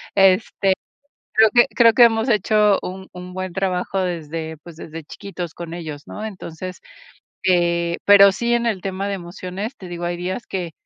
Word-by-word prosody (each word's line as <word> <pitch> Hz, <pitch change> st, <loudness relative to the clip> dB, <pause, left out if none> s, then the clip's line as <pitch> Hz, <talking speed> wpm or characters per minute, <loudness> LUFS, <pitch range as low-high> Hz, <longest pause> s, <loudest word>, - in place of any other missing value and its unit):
Este 195 Hz, 0 st, +3 dB, 0.6 s
creo 220 Hz, 0 st, +6 dB
que 240 Hz, -, +7 dB
creo 230 Hz, -2 st, +6 dB
que 240 Hz, +2 st, +7 dB
hemos 225 Hz, +1 st, +3 dB
hecho 210 Hz, -1 st, +3 dB
un 190 Hz, +1 st, -7 dB
un 180 Hz, 0 st, -9 dB
buen 185 Hz, -1 st, -4 dB
trabajo 190 Hz, +1 st, -1 dB
desde, 160 Hz, -3 st, -4 dB
pues, 170 Hz, -2 st, -11 dB
desde 160 Hz, -1 st, -9 dB
chiquitos 175 Hz, 0 st, -7 dB
con 170 Hz, -1 st, -7 dB
ellos, 155 Hz, -4 st, -7 dB
¿no? 215 Hz, -, -7 dB
Entonces, 185 Hz, -3 st, -7 dB, 0.6 s
eh, 170 Hz, -1 st, +2 dB
pero 200 Hz, -1 st, +8 dB
sí 235 Hz, +5 st, -1 dB
en 235 Hz, 0 st, +1 dB
el 205 Hz, -5 st, -1 dB
tema 195 Hz, +1 st, -3 dB
de 200 Hz, -, -2 dB
emociones, 185 Hz, +6 st, -6 dB
te 185 Hz, -, -10 dB
digo, 175 Hz, 0 st, -6 dB
hay 175 Hz, 0 st, -2 dB
días 185 Hz, +6 st, -4 dB
que 180 Hz, -3 st, -4 dB
185 Hz, 175 wpm, -21 LUFS, 175-205 Hz, 0.6 s, pero